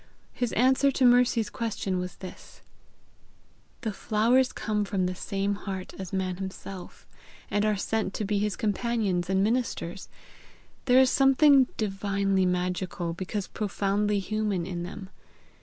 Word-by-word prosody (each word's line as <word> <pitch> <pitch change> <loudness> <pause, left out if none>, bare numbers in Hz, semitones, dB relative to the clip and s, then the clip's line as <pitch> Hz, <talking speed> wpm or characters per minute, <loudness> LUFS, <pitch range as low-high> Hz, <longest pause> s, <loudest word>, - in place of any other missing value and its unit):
His 245 -2 -1
answer 260 +3 +4
to 260 - +2
Mercy's 245 -2 +4
question 215 -6 -2
was 180 0 -5
this: 185 - -11 1.2
"The 220 - -2
flowers 235 +6 +2
come 210 -2 -1
from 195 -2 -1
the 180 - -1
same 195 +2 -2
heart 195 -2 -6
as 190 -2 -6
man 185 -2 -2
himself, 190 -1 -8 0.5
and 205 - +1
are 210 - +2
sent 215 +1 -1
to 215 - -2
be 205 0 0
his 210 -1 0
companions 205 -4 -1
and 190 0 +2
ministers. 220 -6 -2 0.8
There 250 -1 +5
is 260 -1 +5
something 270 0 +5
divinely 195 -2 0
magical, 180 -1 -2
because 185 +3 -4
profoundly 205 0 0
human 200 -2 -1
in 175 -2 -4
them. 190 +2 -7
200 Hz, 140 wpm, -27 LUFS, 190-225 Hz, 1.2 s, There